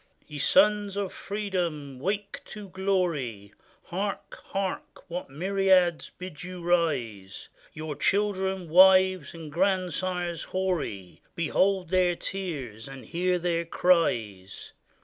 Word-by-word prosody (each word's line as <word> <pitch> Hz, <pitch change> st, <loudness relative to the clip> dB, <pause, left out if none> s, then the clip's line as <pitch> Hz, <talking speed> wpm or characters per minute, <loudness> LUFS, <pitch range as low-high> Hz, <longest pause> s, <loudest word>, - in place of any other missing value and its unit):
] -, -, -36 dB
Ye 150 Hz, -1 st, -7 dB
sons 205 Hz, +4 st, +3 dB
of 200 Hz, -2 st, -2 dB
freedom, 175 Hz, -10 st, -3 dB
wake 200 Hz, +6 st, -3 dB
to 210 Hz, -2 st, -9 dB
glory! 170 Hz, -, -1 dB, 0.3 s
Hark! 195 Hz, +3 st, -4 dB
hark! 195 Hz, -1 st, -4 dB
what 175 Hz, -3 st, -4 dB
myriads 185 Hz, +2 st, +2 dB
bid 180 Hz, -4 st, -8 dB
you 180 Hz, 0 st, -7 dB
rise! 135 Hz, -, -1 dB, 0.2 s
Your 155 Hz, -1 st, -5 dB
children, 190 Hz, +1 st, 0 dB
wives, 185 Hz, -1 st, +5 dB
and 160 Hz, -2 st, -8 dB
grandsires 180 Hz, -1 st, 0 dB
hoary. 165 Hz, -, -3 dB
Behold 185 Hz, +2 st, +1 dB
their 180 Hz, -1 st, +3 dB
tears 145 Hz, -, -5 dB
and 135 Hz, -1 st, -10 dB
hear 180 Hz, +1 st, 0 dB
their 170 Hz, -1 st, 0 dB
cries! 115 Hz, -, 0 dB
180 Hz, 110 wpm, -27 LUFS, 150-190 Hz, 0.3 s, wives